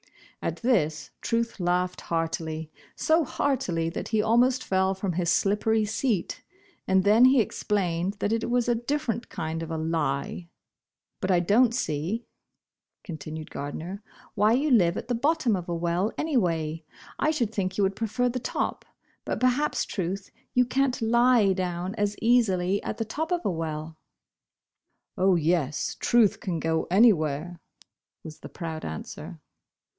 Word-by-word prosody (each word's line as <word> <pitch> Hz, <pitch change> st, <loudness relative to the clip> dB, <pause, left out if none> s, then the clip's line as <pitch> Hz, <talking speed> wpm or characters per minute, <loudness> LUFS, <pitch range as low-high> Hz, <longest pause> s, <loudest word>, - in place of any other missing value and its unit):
At -, -, -4 dB
this 155 Hz, -, +1 dB
Truth 230 Hz, -1 st, -1 dB
laughed 180 Hz, +1 st, 0 dB
heartily, 160 Hz, -1 st, -3 dB, 0.2 s
so 320 Hz, +1 st, +3 dB
heartily 245 Hz, -, -1 dB
that -, -, -5 dB
he 220 Hz, -, 0 dB
almost 245 Hz, +4 st, +3 dB
fell 190 Hz, 0 st, +1 dB
from 190 Hz, -1 st, -2 dB
his 175 Hz, 0 st, 0 dB
slippery 215 Hz, +2 st, +2 dB
seat, 220 Hz, -2 st, -1 dB, 0.5 s
and 190 Hz, 0 st, +3 dB
then 215 Hz, +5 st, +6 dB
he 260 Hz, 0 st, +6 dB
explained 190 Hz, -4 st, 0 dB
that 205 Hz, +1 st, -1 dB
it 230 Hz, +1 st, -1 dB
was 245 Hz, 0 st, +1 dB
a 240 Hz, -, +3 dB
different 240 Hz, -1 st, -2 dB
kind 160 Hz, 0 st, -4 dB
of 165 Hz, -, -5 dB
a 160 Hz, -, -3 dB
"lie." 165 Hz, +1 st, -2 dB, 0.7 s
"But 185 Hz, -, -2 dB
I 180 Hz, -2 st, +4 dB
don't 230 Hz, +7 st, +3 dB
see," 180 Hz, -, -2 dB, 0.8 s
continued 155 Hz, -2 st, -7 dB
Gardner, 165 Hz, +7 st, -6 dB, 0.3 s
"why 215 Hz, +1 st, +3 dB
you 280 Hz, +4 st, +1 dB
live 175 Hz, -8 st, +4 dB
at -, -, -5 dB
the 250 Hz, -, 0 dB
bottom 265 Hz, -1 st, +1 dB
of 180 Hz, -2 st, -5 dB
a 170 Hz, -, -1 dB
well, 175 Hz, +5 st, 0 dB
anyway. 165 Hz, -, 0 dB, 0.4 s
I 305 Hz, -, +2 dB
should 245 Hz, -9 st, 0 dB
think 185 Hz, -3 st, -2 dB
you 205 Hz, -, +2 dB
would 195 Hz, 0 st, +1 dB
prefer 230 Hz, +3 st, 0 dB
the 250 Hz, +1 st, -2 dB
top. -, -, -2 dB, 0.4 s
But -, -, -3 dB
perhaps, 255 Hz, +4 st, +1 dB
Truth, 190 Hz, 0 st, -4 dB, 0.2 s
you 250 Hz, 0 st, +5 dB
can't 260 Hz, +1 st, 0 dB
lie 235 Hz, -3 st, +4 dB
down 180 Hz, 0 st, -3 dB
as 205 Hz, -2 st, -1 dB
easily 200 Hz, -5 st, +2 dB
at 220 Hz, -, -4 dB
the 225 Hz, -, -2 dB
top 315 Hz, -, -4 dB
of 350 Hz, -1 st, +1 dB
a -, -, +2 dB
well." 160 Hz, -2 st, -3 dB
Bosh 160 Hz, -, -11 dB, 1.2 s
Bosh -, -, -4 dB
Oil. 190 Hz, -, +4 dB
29 -, -, +6 dB
"Oh, 185 Hz, -, +5 dB
yes, 160 Hz, -3 st, 0 dB
Truth 235 Hz, -4 st, +3 dB
can 175 Hz, -4 st, -3 dB
go 160 Hz, 0 st, 0 dB
anywhere," 175 Hz, -5 st, +3 dB, 0.6 s
was 155 Hz, -2 st, -10 dB
the -, -, -10 dB
proud 160 Hz, -2 st, -6 dB
answer. 80 Hz, 0 st, -7 dB
195 Hz, 160 wpm, -26 LUFS, 170-235 Hz, 1.2 s, then